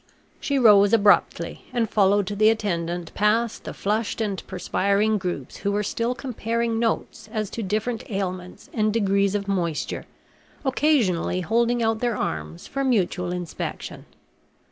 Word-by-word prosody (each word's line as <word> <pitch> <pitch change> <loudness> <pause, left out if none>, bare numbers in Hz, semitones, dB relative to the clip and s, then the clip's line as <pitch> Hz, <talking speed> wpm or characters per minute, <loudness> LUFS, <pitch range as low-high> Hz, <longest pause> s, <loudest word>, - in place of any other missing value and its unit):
She 280 - 0
rose 210 -4 +6
abruptly 205 -2 +3
and 235 -2 0
followed 205 -1 +3
the 210 +2 +3
attendant 175 -6 -2
past 220 +2 +1
the - - -5
flushed 215 +3 -1
and 205 -4 -2
perspiring 200 +3 +1
groups 175 -8 -4
who 200 - -1
were 205 +1 0
still 235 +4 -1
comparing 235 -2 -2
notes 225 -1 -2
as 215 -3 -3
to 230 - -4
different 215 +3 -2
ailments 185 -3 -4
and 215 -1 +1
degrees 200 -2 +2
of 200 -1 -2
moisture, 175 -6 -2 0.6
occasionally 245 - +2
holding 235 +5 +1
out 225 0 +1
their 240 -3 0
arms 80 +1 -4
for 275 - -3
mutual 190 -8 +1
inspection. 180 -3 -5
210 Hz, 140 wpm, -24 LUFS, 190-230 Hz, 0.6 s, rose